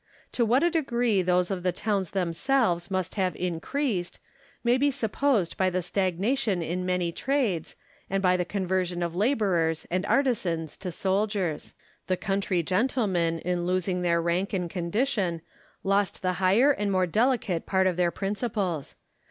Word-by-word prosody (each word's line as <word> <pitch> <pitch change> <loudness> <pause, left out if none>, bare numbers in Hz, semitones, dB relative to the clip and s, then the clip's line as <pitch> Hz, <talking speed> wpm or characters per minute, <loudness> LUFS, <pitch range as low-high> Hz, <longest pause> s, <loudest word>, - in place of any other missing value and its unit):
To 240 - +1
what 245 +6 +3
a 345 - +3
degree 240 - +1
those 180 +1 +1
of 190 -2 -2
the 180 0 +1
towns 200 -2 -1
themselves 185 +1 0
must 185 -2 -2
have 185 -5 0
increased, 180 - -2 0.5
may 240 +1 +4
be 280 +3 +3
supposed 230 -5 0
by 190 -1 +2
the 185 0 -1
stagnation 195 +3 0
in 180 +3 -3
many 180 -2 0
trades, 235 - -1 0.3
and 195 - 0
by 180 -1 +4
the 180 - +1
conversion 180 -2 -1
of 170 -1 -3
labourers 190 - +1
and 185 +1 0
artisans 185 - 0
to 185 -2 -5
soldiers. 190 -3 -1 0.3
The 185 - +1
country 195 -2 0
gentlemen, 185 - +1
in 175 0 -1
losing 185 0 0
their 170 -1 +2
rank 175 +4 -1
and 180 -3 -1
condition, 180 - -1 0.4
lost 195 0 +1
the 185 0 +1
higher 210 +10 +5
and 205 -7 -1
more 185 -1 +2
delicate 210 -3 0
part 190 -1 +2
of 185 -2 +2
their 175 0 +2
principles. 195 - -3
185 Hz, 155 wpm, -27 LUFS, 175-215 Hz, 0.5 s, higher